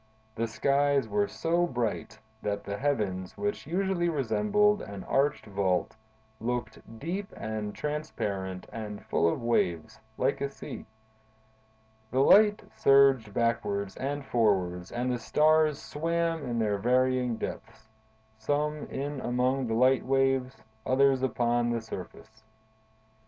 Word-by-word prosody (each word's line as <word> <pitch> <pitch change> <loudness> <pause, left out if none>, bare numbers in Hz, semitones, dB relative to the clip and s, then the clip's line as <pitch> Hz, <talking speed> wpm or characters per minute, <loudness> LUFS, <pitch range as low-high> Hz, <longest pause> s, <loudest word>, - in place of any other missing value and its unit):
The 115 +1 -2
skies 140 +2 +2
were 105 -1 +1
so 170 +1 0
bright 115 -4 -3 0.2
that 100 -1 -2
the 100 - -4
heavens, 105 -10 -1
which 205 -7 -3
usually 180 0 0
resemble 210 - +2
an 100 -2 -7
arched 140 +2 +1
vault, 95 -3 -1 0.4
looked 120 -1 -3 0.2
deep 185 - -4
and 110 -1 -4
transparent 100 -12 -4
and 105 -2 -6
full 85 - +2
of - - -4
waves, 85 -9 0 0.2
like 130 +2 0
a 140 - -1
sea. 140 - -9 1.2
The 130 +3 +1
light 210 +7 +6
surged 135 -5 +5
backwards 100 -4 0
and 140 +1 -3
forwards 95 -7 +1
and 125 +1 -1
the 125 - -1
stars 155 +4 +3
swam 165 -1 -2
in 120 -1 -2
their 105 -3 0
varying 125 +1 +2
depths: 110 - -7 0.5
some 150 +5 -1
in 140 0 -4
among 125 +2 0
the 110 - -1
light 130 +2 +4
waves; 135 -1 +1 0.2
others 135 0 +3
upon 120 -1 +1
the 120 0 0
surface. 110 +1 -10
125 Hz, 125 wpm, -29 LUFS, 110-145 Hz, 1.2 s, light